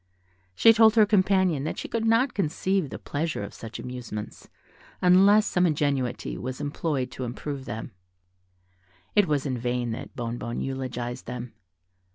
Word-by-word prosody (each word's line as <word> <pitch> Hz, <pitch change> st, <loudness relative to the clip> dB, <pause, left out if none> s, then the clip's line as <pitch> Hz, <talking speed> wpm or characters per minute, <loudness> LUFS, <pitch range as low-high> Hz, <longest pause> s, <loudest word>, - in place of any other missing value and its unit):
She 225 Hz, -, +7 dB
told 220 Hz, -1 st, +6 dB
her 220 Hz, -2 st, +7 dB
companion 190 Hz, -7 st, +2 dB
that -, -, -3 dB
she -, -, -5 dB
could 230 Hz, -1 st, -2 dB
not 230 Hz, +3 st, +3 dB
conceive 190 Hz, -1 st, 0 dB
the -, -, -6 dB
pleasure 155 Hz, -5 st, -3 dB
of 100 Hz, -, -7 dB
such 115 Hz, 0 st, -8 dB
amusements, 120 Hz, -4 st, -7 dB, 0.5 s
unless 195 Hz, +4 st, +6 dB
some 180 Hz, -4 st, +2 dB
ingenuity 140 Hz, -5 st, -1 dB
was 130 Hz, +1 st, -5 dB
employed 145 Hz, -3 st, -2 dB
to 130 Hz, -, -6 dB
improve 130 Hz, +3 st, -5 dB
them: 115 Hz, -3 st, -6 dB, 1.2 s
it 205 Hz, -3 st, +5 dB
was 145 Hz, -2 st, 0 dB
in 130 Hz, -3 st, -2 dB
vain 120 Hz, 0 st, -1 dB
that 115 Hz, -, -7 dB
Bonnebonne 120 Hz, 0 st, -4 dB
eulogized 125 Hz, -2 st, -4 dB
them. 125 Hz, 0 st, -6 dB
140 Hz, 150 wpm, -26 LUFS, 125-190 Hz, 1.2 s, She